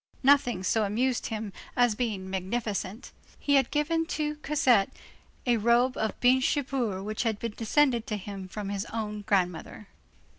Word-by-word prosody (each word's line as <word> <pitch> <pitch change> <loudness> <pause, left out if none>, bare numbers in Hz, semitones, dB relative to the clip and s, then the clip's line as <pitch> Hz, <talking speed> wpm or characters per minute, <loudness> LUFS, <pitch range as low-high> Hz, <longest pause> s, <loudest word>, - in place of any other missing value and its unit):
Nothing 255 -8 +4
so 220 +3 +2
amused 240 +5 0
him 215 -2 -4 0.2
as 245 -2 +4
being 210 -5 -3
magnificent. 195 +2 -3 0.3
He 285 - 0
had 270 -3 +4
given 325 +2 0
to 300 -1 -2
Cosette 265 -9 +3 0.6
a 240 -2 +3
robe 235 +3 +3
of 220 -2 -2
Binche 260 +3 +3
guipure 235 -8 -2
which 215 +1 -3
had 225 -3 0
descended 235 +3 +1
to 210 - -2
him 195 -1 -7
from 200 +1 -5
his 200 +1 -3
own 210 -2 -4
grandmother. 195 0 -1
225 Hz, 150 wpm, -28 LUFS, 205-255 Hz, 0.6 s, Nothing